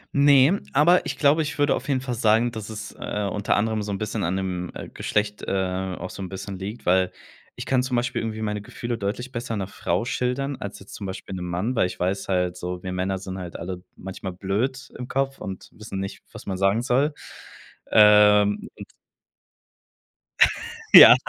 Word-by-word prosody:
Ne, 140 Hz, +5 st, +6 dB
aber 170 Hz, +5 st, +5 dB
ich 140 Hz, -3 st, -3 dB
glaube, 150 Hz, +2 st, +4 dB
ich 150 Hz, 0 st, -3 dB
würde 145 Hz, 0 st, +3 dB
auf 130 Hz, -, -4 dB
jeden 135 Hz, -2 st, +1 dB
Fall 125 Hz, -2 st, -3 dB
sagen, 115 Hz, +1 st, +3 dB
dass 110 Hz, -2 st, -7 dB
es, 110 Hz, -1 st, -6 dB
äh, 105 Hz, 0 st, -3 dB
unter 105 Hz, -1 st, 0 dB
anderem 110 Hz, 0 st, 0 dB
so 100 Hz, 0 st, -3 dB
'n -, -, -2 dB
bisschen 110 Hz, 0 st, -3 dB
an 90 Hz, +3 st, 0 dB
dem, 90 Hz, -2 st, -3 dB
äh, -, -, -7 dB
Geschlecht, 105 Hz, 0 st, -1 dB
äh, 95 Hz, -1 st, -1 dB
auch 90 Hz, -, -6 dB
so -, -, -8 dB
'n 95 Hz, -, -4 dB
bisschen 95 Hz, 0 st, -7 dB
liegt, 105 Hz, +5 st, -6 dB
weil 90 Hz, 0 st, +3 dB, 0.4 s
ich -, -, -6 dB
kann 130 Hz, -1 st, +2 dB
zum 130 Hz, -1 st, -2 dB
Beispiel 120 Hz, 0 st, 0 dB
irgendwie 110 Hz, -1 st, -4 dB
meine 105 Hz, -1 st, -2 dB
Gefühle 120 Hz, +3 st, -5 dB
deutlich 115 Hz, +6 st, -3 dB
besser 120 Hz, -2 st, -4 dB
'ner 95 Hz, -2 st, -3 dB
Frau 90 Hz, +1 st, -1 dB
schildern 130 Hz, +3 st, -1 dB
als 100 Hz, 0 st, -7 dB
jetzt 100 Hz, -, -11 dB
zum 100 Hz, -, -6 dB
Beispiel 95 Hz, 0 st, -7 dB
'nem 90 Hz, -1 st, -4 dB
Mann, 95 Hz, +9 st, -1 dB
weil -, -, +4 dB
ich -, -, -8 dB
weiß 95 Hz, +2 st, -1 dB
halt 90 Hz, -1 st, 0 dB
so: 90 Hz, 0 st, -5 dB
Wir 95 Hz, -, -4 dB
Männer 95 Hz, +1 st, -1 dB
sind 95 Hz, 0 st, -6 dB
halt 90 Hz, -2 st, -7 dB
alle 90 Hz, +1 st, -6 dB
manchmal 95 Hz, 0 st, -7 dB
blöd 105 Hz, +9 st, -2 dB
im 125 Hz, -, -6 dB
Kopf 135 Hz, +1 st, -1 dB
und 95 Hz, -1 st, -7 dB
wissen 105 Hz, -3 st, -7 dB
nicht, 95 Hz, -, -6 dB
was -, -, -10 dB
man 95 Hz, -2 st, -3 dB
sagen 95 Hz, +4 st, +2 dB
soll. 135 Hz, +5 st, +2 dB, 0.8 s
Ähm, 105 Hz, -1 st, +6 dB
und -, -, -9 dB, 2.1 s
Ja. -, -, +12 dB
105 Hz, 200 wpm, -24 LUFS, 95-125 Hz, 2.1 s, Ja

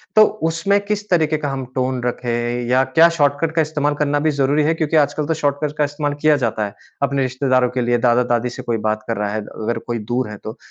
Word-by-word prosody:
तो 215 Hz, -, +9 dB, 0.3 s
उसमें 195 Hz, +5 st, +1 dB
किस 210 Hz, 0 st, -3 dB
तरीके 160 Hz, -3 st, +2 dB
का 145 Hz, -2 st, -3 dB
हम 135 Hz, -1 st, -4 dB
टोन 130 Hz, -1 st, -1 dB
रखें 120 Hz, 0 st, -2 dB
या 130 Hz, +1 st, +4 dB
क्या 160 Hz, +6 st, +5 dB
शॉर्टकट 145 Hz, +2 st, +1 dB
का 160 Hz, -, +4 dB
इस्तेमाल 150 Hz, -1 st, 0 dB
करना 145 Hz, 0 st, 0 dB
भी 155 Hz, +1 st, +1 dB
ज़रूरी 145 Hz, +2 st, +1 dB
है? 160 Hz, +2 st, +2 dB
क्योंकि 160 Hz, 0 st, -1 dB
आजकल 150 Hz, 0 st, +1 dB
तो 160 Hz, -, +1 dB
शॉर्टकट 145 Hz, +1 st, -1 dB
का 150 Hz, -, +2 dB
इस्तेमाल 145 Hz, 0 st, -2 dB
किया 155 Hz, -1 st, +5 dB
जाता 110 Hz, -1 st, -1 dB
है। 100 Hz, -, -7 dB, 0.3 s
अपने 140 Hz, 0 st, +1 dB
रिश्तेदारों 130 Hz, -1 st, +1 dB
के 125 Hz, 0 st, -2 dB
लिए, 120 Hz, 0 st, +2 dB
दादा-दादी 120 Hz, 0 st, +2 dB
से 130 Hz, -, -8 dB
कोई 120 Hz, -2 st, -1 dB
बात 110 Hz, 0 st, -2 dB
कर 115 Hz, -, -2 dB
रहा 105 Hz, -1 st, -1 dB
है, 110 Hz, -, -2 dB
अगर 115 Hz, +3 st, -4 dB
कोई 120 Hz, -1 st, -2 dB
दूर 125 Hz, -3 st, 0 dB
है 105 Hz, -, -7 dB
तो, 110 Hz, +4 st, -7 dB
135 Hz, 235 wpm, -19 LUFS, 120-150 Hz, 0.3 s, तो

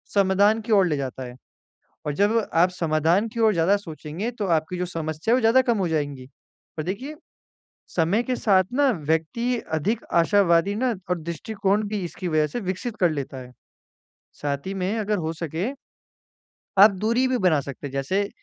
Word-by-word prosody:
समाधान 200 Hz, +2 st, +4 dB
की 225 Hz, +1 st, -6 dB
ओर 195 Hz, -2 st, +5 dB
ले 150 Hz, -3 st, 0 dB
जाता 130 Hz, -1 st, -4 dB
है 125 Hz, 0 st, -9 dB, 0.7 s
और 150 Hz, -, -1 dB
जब 205 Hz, +6 st, +2 dB, 0.2 s
आप 175 Hz, +2 st, +4 dB
समाधान 165 Hz, +4 st, +1 dB
की 230 Hz, +1 st, -5 dB
ओर 220 Hz, -1 st, +5 dB
ज़्यादा 170 Hz, +5 st, +3 dB
सोचेंगे 165 Hz, +4 st, -6 dB
तो 205 Hz, -, -1 dB
आपकी 160 Hz, +4 st, -6 dB
जो 180 Hz, -, -1 dB
समस्या 160 Hz, +4 st, -3 dB
है -, -, +6 dB
वो -, -, +1 dB
ज़्यादा 235 Hz, +3 st, +5 dB
कम 235 Hz, -4 st, +1 dB
हो 185 Hz, -3 st, 0 dB
जाएँगी। 145 Hz, -5 st, -2 dB, 0.5 s
और 155 Hz, -, -2 dB
देखिए 250 Hz, -, -4 dB, 0.7 s
समय 180 Hz, +7 st, +1 dB
के 255 Hz, -1 st, -1 dB
साथ 190 Hz, -3 st, +3 dB
ना 280 Hz, -1 st, +4 dB, 0.2 s
व्यक्ति 235 Hz, +11 st, 0 dB, 0.2 s
अधिक 210 Hz, +9 st, -1 dB
आशावादी 175 Hz, +1 st, +3 dB
ना 245 Hz, 0 st, 0 dB, 0.2 s
और 180 Hz, -, +1 dB
दृष्टिकोण 195 Hz, +5 st, -1 dB
भी 210 Hz, -1 st, -2 dB
इसकी 180 Hz, +1 st, -5 dB
वजह 155 Hz, -2 st, +2 dB
से 240 Hz, -, -4 dB
विकसित 195 Hz, +4 st, -4 dB
कर 175 Hz, -3 st, +4 dB
लेता 140 Hz, -2 st, -5 dB
है। 125 Hz, 0 st, -11 dB, 0.9 s
साथ 140 Hz, +3 st, -3 dB
ही 195 Hz, -, -3 dB
में 190 Hz, +2 st, -1 dB
अगर 210 Hz, 0 st, 0 dB
हो 160 Hz, 0 st, -2 dB
सके 165 Hz, -, -3 dB, 1.1 s
आप 205 Hz, +3 st, +9 dB
दूरी 235 Hz, +4 st, +2 dB
भी 255 Hz, -1 st, +1 dB
बना 175 Hz, -8 st, +3 dB
सकते 140 Hz, +1 st, -7 dB
हैं। 135 Hz, -, -7 dB
जैसे, 185 Hz, +10 st, -1 dB
185 Hz, 185 wpm, -24 LUFS, 160-215 Hz, 1.1 s, आप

